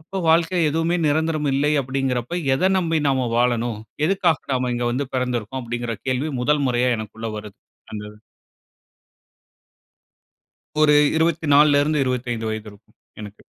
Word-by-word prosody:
அப்போ, 170 +5 -9
வாழ்க்கையில 165 +2 +3
எதுவுமே 165 +3 0
நிரந்தரம் 155 0 0
இல்லை, 145 +2 +1
அப்பிடிங்கிறப்ப, 130 +3 -2 0.2
"எத 185 +8 +2
நம்பி 165 -3 +1
நாம 130 -3 +1
வாழணும்? 120 -2 +1 0.3
எதுக்காக 180 -4 +2
நாம 125 -1 0
இங்க 120 0 -2
வந்து 135 +3 -2
பெறந்திருக்கோம்?" 125 -1 -2
அப்பிடிங்கிற 120 0 -4
கேள்வி 130 +4 -1
முதல் 145 +3 +1
முறையா 125 0 +1
எனக்குள்ள 110 +1 -6
வருது. 105 -1 -9 0.4
அந்த 105 -1 -6 2.8
ஒரு 150 -1 +5 0.2
24ல 150 -3 +4
இருந்து 150 -1 +1
25 120 -3 -2
வயது 110 0 -5
இருக்கும், 100 - -22 0.2
எனக்கு. 105 -1 -10
130 Hz, 130 wpm, -22 LUFS, 120-155 Hz, 2.8 s, ஒரு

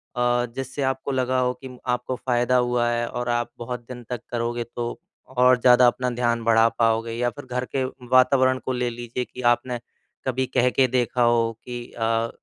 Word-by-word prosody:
अ, 120 0 +2
जिससे 135 +1 -5
आपको 130 +1 -1
लगा 130 -1 +1
हो 125 0 +1
कि 130 -1 -9
आपको 125 +1 -1
फ़ायदा 125 0 +1
हुआ 120 -1 +1
है 120 0 0
और 120 0 -4
आप 120 0 0
बहुत 125 +1 -5
दिन 125 -1 -8
तक 125 -3 -4
करोगे 120 0 -1
तो 120 0 -4 0.3
और 125 -1 +4
ज़्यादा 125 0 +7
अपना 125 +1 +1
ध्यान 120 -1 0
बढ़ा 115 0 +5
पाओगे? 115 0 +1
या 120 +1 0
फिर 145 +3 -11
घर 125 0 -3
के 135 - +2 0.3
वातावरण 130 0 +4
को - - -1
ले 125 -1 -1
लीजिए 120 +1 -5
कि 125 - -10
आपने 120 0 0 0.5
कभी 130 0 0
कह 125 +1 +4
के 130 +1 +3
देखा 125 0 0
हो 120 -1 +3
कि 120 -1 -7
अ, 115 0 0
125 Hz, 195 wpm, -24 LUFS, 120-125 Hz, 0.5 s, ज़्यादा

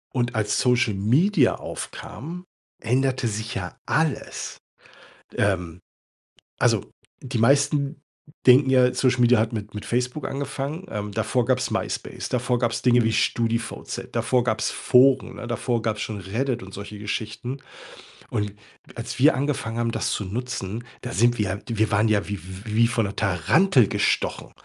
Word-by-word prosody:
Und 120 -1 0
als 110 -2 0
Social 125 -3 +3
Media 130 - +3
aufkam, 175 +6 -7 0.4
änderte 130 +2 +1
sich 110 +3 -4
ja 90 -6 -5
alles. 160 -1 -1 0.8
Ähm, 90 -4 0 0.8
also - - +2 0.3
die 125 -2 -4
meisten 140 +4 +3 0.5
denken 130 +1 +7
ja, 125 -1 +4
Social 130 -1 +2
Media 120 -2 +5
hat 110 +1 0
mit 105 -2 -5
mit 105 - -6
Facebook 125 +4 -1
angefangen. 140 +5 -4
Ähm, 105 -1 -4
davor 125 +4 0
gab's 130 +1 +1
MySpace, - - -3
davor 125 0 0
gab's 120 -2 0
Dinge 120 -1 +4
wie 115 0 +1
StudiVZ, 115 +1 -1
davor 120 +1 +1
gab's 110 -2 0
Foren, 130 +1 +4
ne, - - -7
davor 120 0 -1
gab's 110 -2 -1
schon 110 -2 -4
Reddit 115 +5 -2
und 95 - -10
solche 100 +1 -8
Geschichten. 110 +5 -4 0.7
Und 105 -1 -2 0.4
als 115 0 -5
wir 150 +5 +6
angefangen 130 -4 -2
haben, 115 0 0
das - - -1
zu 105 - -1
nutzen, 115 0 -4 0.2
da 120 - -6
sind 120 +3 +3
wir 105 - +1
ja 95 +2 -3
wir 110 -1 +1
waren 105 +1 +3
ja 105 -2 +1
wie 100 0 -3
w 95 +5 -7
wie 115 +1 +5
von 115 -2 0
'ner 100 - -5
Tarantel 110 - +3
gestochen. - - 0
120 Hz, 155 wpm, -24 LUFS, 105-130 Hz, 0.8 s, denken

